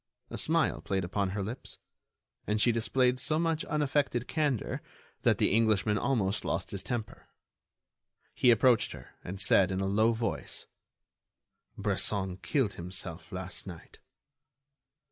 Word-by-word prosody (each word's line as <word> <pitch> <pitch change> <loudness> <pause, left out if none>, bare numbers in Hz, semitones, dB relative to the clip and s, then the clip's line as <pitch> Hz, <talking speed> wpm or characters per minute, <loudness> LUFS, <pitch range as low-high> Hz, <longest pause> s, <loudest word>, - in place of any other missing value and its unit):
A - - -4
smile - - +2
played 95 -1 -1
upon 95 +2 -1
her 100 +1 -2
lips; 115 +7 -6 0.7
and 105 +1 +1
she 120 - +5
displayed 125 +3 +2
so 155 +4 +1
much 165 -1 +1
unaffected 145 -5 0
candor 145 -8 -1 0.4
that - - +3
the - - +2
Englishman 110 -2 +3
almost 105 -7 0
lost - - -2
his 100 - -4
temper. 120 -4 -5 1.1
He 125 - +3
approached 120 -1 +4
her - - -11
and 95 +2 -6
said, 95 0 +4
in 95 - -1
a 95 - 0
low 110 +4 +3
voice: 115 0 -3 1.1
"Bresson 100 -2 -1
killed 105 +4 0
himself 90 -1 -6
last 95 +1 -5
night." 85 -3 -11
105 Hz, 135 wpm, -30 LUFS, 95-125 Hz, 1.1 s, she